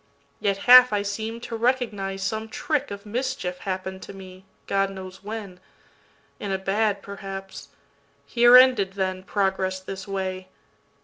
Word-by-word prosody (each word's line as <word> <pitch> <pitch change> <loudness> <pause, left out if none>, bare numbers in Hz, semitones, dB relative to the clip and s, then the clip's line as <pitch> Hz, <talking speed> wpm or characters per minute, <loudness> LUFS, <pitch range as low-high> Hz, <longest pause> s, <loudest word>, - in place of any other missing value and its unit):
Yet 200 -2 0
half 250 0 +9
I 205 -1 0
seem'd 220 +3 -4
to 230 - -5
recognize 220 -6 -1
some 220 +3 -3
trickOf 265 -8 -3
mischief 230 -5 -3
happen'd 190 0 -5
to - - -9
me, 190 -1 -12 0.2
God 195 0 +1
knows 190 0 -10
when—In 200 -1 -10
a 190 - 0
bad 200 +1 0
perhaps. 195 -6 -8 0.6
Here 240 - +7
ended, 250 -7 +5
then, 185 -1 -2
Progress 190 -1 -1
this 190 +1 -8
way. 190 -1 -4
195 Hz, 130 wpm, -24 LUFS, 190-220 Hz, 0.6 s, half